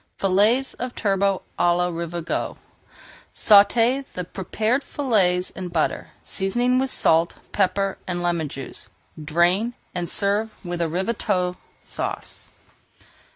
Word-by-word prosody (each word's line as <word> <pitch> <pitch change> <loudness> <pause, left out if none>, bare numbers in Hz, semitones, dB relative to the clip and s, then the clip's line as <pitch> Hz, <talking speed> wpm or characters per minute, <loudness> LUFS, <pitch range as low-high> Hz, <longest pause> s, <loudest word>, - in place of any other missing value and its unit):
FILLETS 210 +8 +2
OF 250 0 -4
TURBOT 195 -1 +1 0.2
À 175 0 +3
LA 180 0 +1
RAVIGOTE 170 0 -3 0.7
Sauté 230 +6 +5
the 180 - -2
prepared 215 +8 -1
fillets 195 -12 +1
in 185 -1 -6
butter, 170 -3 -1
seasoning 240 +6 +1
with 265 0 0
salt, 165 -7 +3 0.2
pepper, 195 0 0
and 175 -1 -2
lemon 170 -3 0
juice. 135 -1 -8 0.3
Drain, 175 +9 +2 0.2
and 175 -1 -2
serve 210 +2 0
with 175 0 -3
Ravigote 180 +1 0 0.3
Sauce. - - -5
190 Hz, 110 wpm, -23 LUFS, 175-220 Hz, 0.7 s, Sauté